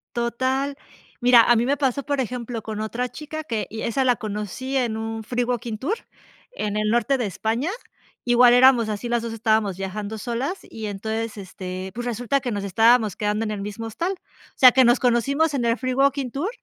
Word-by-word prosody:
Total. 260 +4 -1 0.5
Mira, 245 -1 +7
a 240 - +4
mí 230 - +2
me 280 +3 +1
pasó, 275 -1 0
por 285 0 -2
ejemplo, 245 -2 -3
con 215 0 -5
otra 240 +3 -3
chica 310 +2 -7
que, 225 -7 -3
y 220 0 -6
esa 235 +3 0
la 250 -2 +3
conocí 210 +5 -5
en 235 -4 0
un 225 0 -4
free 245 +2 -1
walking 240 -2 -3
tour, 295 - -1 0.6
en 210 - -3
el 215 0 0
norte 240 +4 +2
de 245 - -1
España. 225 - -2 0.6
Igual 245 0 +6
éramos 245 -3 +6
así, 210 +3 -3
las 240 -1 +1
dos 230 - -4
estábamos 220 -4 +1
viajando 205 +3 -5
solas 250 - -3
y 220 -1 -6
entonces, 220 +2 -4
este, 185 -1 -7
pues, 240 +1 -4
resulta 245 +3 0
que 245 - -3
nos 205 -2 -3
estábamos 225 +1 +3
quedando 210 +1 -1
en 215 - -3
el 205 -2 -4
mismo 210 +3 -6
hostal. 335 - -2
O 370 - -21
sea, 255 -1 +9
que 260 +1 +5
nos 240 +1 +4
conocimos 275 +6 +2
en 255 -4 0
el 230 0 +2
free 255 0 -2
walking 275 -1 +1
tour, 315 +10 -2
235 Hz, 205 wpm, -23 LUFS, 215-260 Hz, 0.6 s, sea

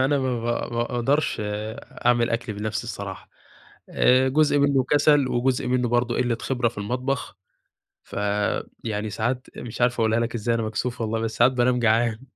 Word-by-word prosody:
أنا 140 +2 +2
ما 130 -3 -1
با 120 +1 -2
ما 120 - +1
أقدَرش 125 +5 0 0.7
أعمِل 120 -1 +3
أكْلي 115 -2 -2
بنفْسي 110 +2 -3
الصراحة، 100 -4 -7 0.6
آآ، 130 +1 +4
جُزء 145 +1 +3
مِنُّه 140 -2 +3
كسَل 145 -2 +4
وجزء 125 +1 0
مِنُّه 125 -1 +1
برضه 120 0 +1
قِلّة 120 -2 +1
خبرة 125 -3 0
في 110 - -10
المطبخ، 125 +2 -3 0.7
ف - - -11 0.7
يعني 110 -1 -2
ساعات، 120 +5 -2
مش 120 0 -7
عارف 125 0 +2
أقولها 110 +1 +2
لك 115 +1 -2
إزاي، 115 +1 0
أنا 115 - 0
مكسوف 110 +3 -3
والله 115 0 -1
بس 115 0 -3
ساعات 120 +2 +5
بانام 125 0 +2
جعان. 115 -1 +2
120 Hz, 170 wpm, -24 LUFS, 115-130 Hz, 0.7 s, ساعات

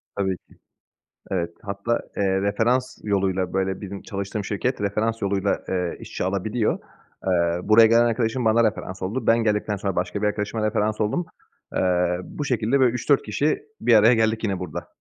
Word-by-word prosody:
Tabii 95 -2 -1
ki, - - -25 0.7
evet 85 -3 0
hatta, 100 +4 -2 0.2
eee, 95 -1 +1
referans 120 +6 +1
yoluyla 95 -3 0
böyle 95 0 -1
bizim 100 -1 -6
çalıştığım 100 0 -4
şirket 115 +4 -2
referans 110 +3 -1
yoluyla, 100 0 0
eee, 90 -2 -1
işçi - - -5
alabiliyor. 105 +4 0 0.5
Eee, 85 -1 +2
buraya 110 +2 +7
gelen 115 +1 +5
arkadaşım 115 +1 0
bana 115 +1 +4
referans 95 -4 -2
oldu. 110 +6 -3
Ben 115 - +6
geldikten 105 -1 0
sonra 100 -1 -3
başka 100 - -2
bir 105 - +2
arkadaşıma 105 +1 -2
referans 110 0 0
oldum. 110 +12 0 0.5
Eee, 90 -1 +2
bu 145 - -6
şekilde 125 +1 +1
böyle 130 -2 +5
3-4 135 +3 +2
kişi 145 +8 -1 0.2
bir 120 +1 +4
araya 110 +3 +7
geldik 110 0 +1
yine 100 -4 -1
burada. 90 -5 -6
105 Hz, 170 wpm, -24 LUFS, 95-115 Hz, 0.7 s, buraya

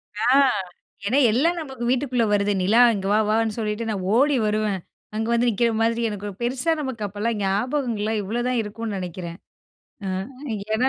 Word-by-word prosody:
ஆ 215 - 0 0.8
ஏன்னா 255 +7 +3
எல்லாம் 330 +9 +2
நமக்கு 265 -5 -7
வீட்டுக்குள்ள 250 -2 +1
வருது. 205 0 +2
நிலா 225 +6 +5
இங்க 195 -1 -3
வா 215 - +4
வான்னு 220 0 +1
சொல்லிட்டு 215 +1 -2
நான் 195 -4 -2
ஓடி 280 +3 +4
வருவேன். 210 -2 0 0.4
அங்க 220 +1 -1
வந்து 235 +1 +2
நிற்கிற 235 +2 +2
மாதிரி 230 +1 +1
எனக்கு 205 0 -5
பெருசா 255 +7 0
நமக்கு 255 -6 -4
அப்போலாம் 210 +3 -2
ஞாபகங்கள்லாம் 220 +1 0
இவ்வளோதான் 240 +4 -1
இருக்கும்னு 210 -1 -5
நினைக்கிறேன். 175 -1 -6 0.7
அ - - -1 0.7
ஏன்னா 255 +4 +3
225 Hz, 155 wpm, -23 LUFS, 205-245 Hz, 0.8 s, நிலா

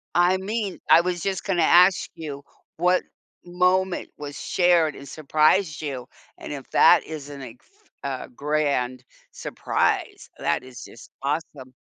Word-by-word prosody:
I 175 +2 +4
mean 205 0 -3
I 165 - +8
was 175 -1 -2
just 190 +1 -2
gonna 185 -4 0
ask 180 +3 +5
you 145 -4 -7 0.3
what 180 +2 +2 0.4
moment 180 +1 +1
was 145 -1 -7
shared 175 -4 +2
and 140 - -11
surprised 155 +4 +1
you 135 -5 -5 0.3
and - - -8
if - - -9
that - - +6
isn't 145 -3 -8
a 120 -2 -9
f 415 +2 -32
a 135 -2 -4
grand 140 -3 -1 0.3
surprise; - - -2
that - - 0
is 130 -1 -11
just - - -13
awesome. 140 -3 -4
155 Hz, 140 wpm, -24 LUFS, 140-180 Hz, 0.4 s, I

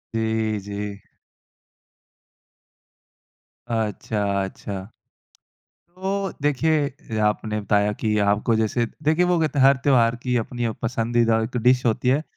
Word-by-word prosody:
जी, 110 -1 0
जी। 100 0 -5 2.7
अच्छा, 105 -3 -1
अच्छा। 95 0 -6 1.2
तो 195 +1 -2
देखिए 145 -5 0
आपने 105 0 0
बताया 105 +1 +1
कि 105 0 -1
आपको 105 +3 +2
जैसे 110 +2 0 0.2
देखिए, 155 +4 +3
वो 180 -1 +2
कहते 155 -2 0
है 135 - +5
हर 135 +1 +6
त्योहार 120 -4 +4
की 125 +1 -2
अपनी 120 +1 -2
अ, 115 - 0
पसंदीदा 115 0 +1
एक 120 +3 -4
डिश 125 +1 +4
होती 115 +2 +1
है। 135 +4 +3
115 Hz, 120 wpm, -23 LUFS, 105-135 Hz, 2.7 s, हर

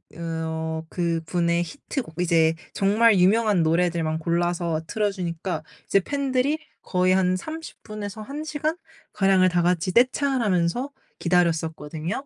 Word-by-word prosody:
으 - - -12
어 160 -1 -3
그분의 170 0 0
히트곡 240 - -6
이제 165 -2 +3 0.2
정말 210 +1 +4
유명한 205 0 +4
노래들만 165 -1 +1
골라서 170 0 0
틀어주니까 180 -5 -2 0.2
이제 195 - +3
팬들이 275 +5 0 0.2
거의 185 0 +2
한 185 -1 +2
30 320 - -8
분에서 215 0 -6
1 290 +6 -6
시간 310 +1 -2 0.4
가량을 195 -2 +4
다 175 -1 +1
같이 180 +1 +1
떼창을 260 +1 +3
하면서 190 +7 +1 0.3
기다렸었거든요. 165 - 0
180 Hz, 290 characters per minute, -24 LUFS, 165-220 Hz, 0.4 s, 정말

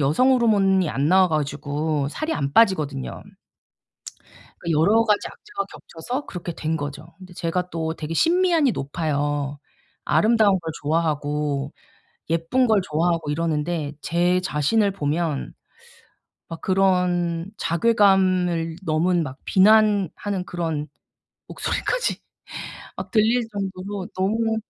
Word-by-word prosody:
여성 155 - +3
호르몬이 195 -7 +3
안 140 +2 0
나와 185 +1 +5
가지고 150 -1 -1
살이 315 - -3
안 140 0 -2
빠지거든요. 150 - +1 1.4
그러니까 165 -3 0
여러 215 +8 +4
가지 210 -2 +1
악재가 410 -1 -6
겹쳐서 245 - -6
그렇게 175 -2 -6
된 160 +1 -2
거죠. 145 +2 -7
근데 185 -1 -13
제가 180 +1 -2
또 160 -2 -3
되게 155 0 -6
심미안이 335 - +3
높아요. 145 -2 -2 0.5
아름다운 215 -3 +3
걸 165 -2 -5
좋아하고 150 -2 -1 0.6
예쁜 165 +11 +2
걸 220 -3 +3
좋아하고 165 -1 0
이러는데 155 -1 -1
제 175 +3 +1
자신을 190 +5 +1
보면 155 -2 -2 1.0
막 165 -1 -7
그런 180 -2 +1
자괴감을 185 -4 +2
넘은 170 +2 +1
막 135 -3 -6
비난하는 205 -2 +3
그런 160 -4 -3 0.6
목소리까지 - - -2 0.8
막 - - -6
들릴 225 +2 +3
정도로 195 -1 -4
너무 220 +4 0
175 Hz, 265 characters per minute, -23 LUFS, 155-200 Hz, 1.4 s, 나와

